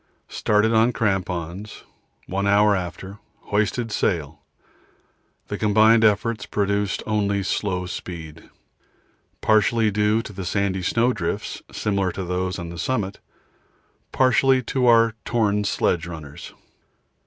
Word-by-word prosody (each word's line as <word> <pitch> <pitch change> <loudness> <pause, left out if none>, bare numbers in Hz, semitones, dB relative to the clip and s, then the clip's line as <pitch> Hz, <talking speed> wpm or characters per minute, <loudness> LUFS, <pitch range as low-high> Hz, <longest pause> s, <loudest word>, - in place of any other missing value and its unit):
Started 105 +2 +1
on 115 +2 +3
crampons; 95 -2 -3 0.4
one 100 +2 -2
hour 105 0 +4
after, 95 +2 -6 0.2
hoisted 110 +3 -1
sail; 80 -7 -1 1.1
the - - -5
combined 110 +2 +4
efforts 110 +1 +1
produced 100 -1 -1
only 100 -2 0
slow 95 -2 -2
speed, 85 -3 -8 0.9
partly 110 +1 +3
due 105 +2 +1
to 105 - -9
the 95 0 -6
sandy 95 0 -1
snowdrifts 115 -3 -1
similar 100 -3 -1
to 95 - -4
those 90 +1 -2
on 85 -1 -7
summit, 100 -3 -2 0.9
partly 130 0 +3
to 125 +1 0
our 115 -1 +5
torn 105 -3 +1
sledge 85 -4 0
runners. 75 -4 -9
100 Hz, 110 wpm, -23 LUFS, 95-110 Hz, 1.1 s, our